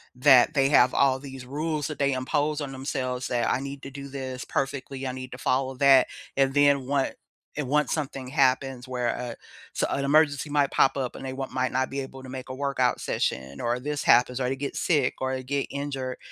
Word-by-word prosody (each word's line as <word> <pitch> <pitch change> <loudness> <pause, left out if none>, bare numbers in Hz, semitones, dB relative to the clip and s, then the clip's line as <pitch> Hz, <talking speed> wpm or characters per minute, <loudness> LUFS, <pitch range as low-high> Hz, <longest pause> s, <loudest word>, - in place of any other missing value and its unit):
that 130 +2 +6
they 135 -2 +3
have 130 -3 +5
all 135 -1 +3
these 135 -2 -9
rules 150 +2 -2
that 150 - -7
they 140 -1 +2
impose 145 +4 -1
on 140 -2 -4
themselves 130 -2 -3
that 120 -1 0
"I - - +1
need 140 0 -6
to 135 - -7
do 140 0 -8
this 130 -2 -6
perfectly, 135 -1 -3
I - - -2
need 130 0 -7
to - - -7
follow 130 +1 0
that," 135 -1 +6 0.3
and 135 0 +2
then 140 -2 +3
one 140 -1 +1 0.5
and 150 -3 -2
once 150 +3 +1
something 135 -4 -3
happens 130 -2 +1
where 125 -1 -2
a 120 0 -4 0.4
so, - - 0
an 140 - -1
emergency 145 0 +3
might 145 -1 +2
pop 135 +1 +3
up 130 -2 -3
and - - -8
they 130 - -4
want 135 0 -5
might 130 0 -1
not 130 +1 0
be 140 - -3
able 135 -1 -7
to 130 - -9
make 130 0 -7
a 130 - -5
workout 135 -2 0
session 65 +2 -2
or 120 +1 0
this 145 +3 -3
happens 125 +1 +4
or 125 -1 0
they 135 - -1
get 140 +1 -5
sick 145 -7 +1
or 130 0 0
they 130 - -5
get 140 +2 -2
injured, 135 -3 -4
135 Hz, 225 wpm, -26 LUFS, 130-140 Hz, 0.5 s, that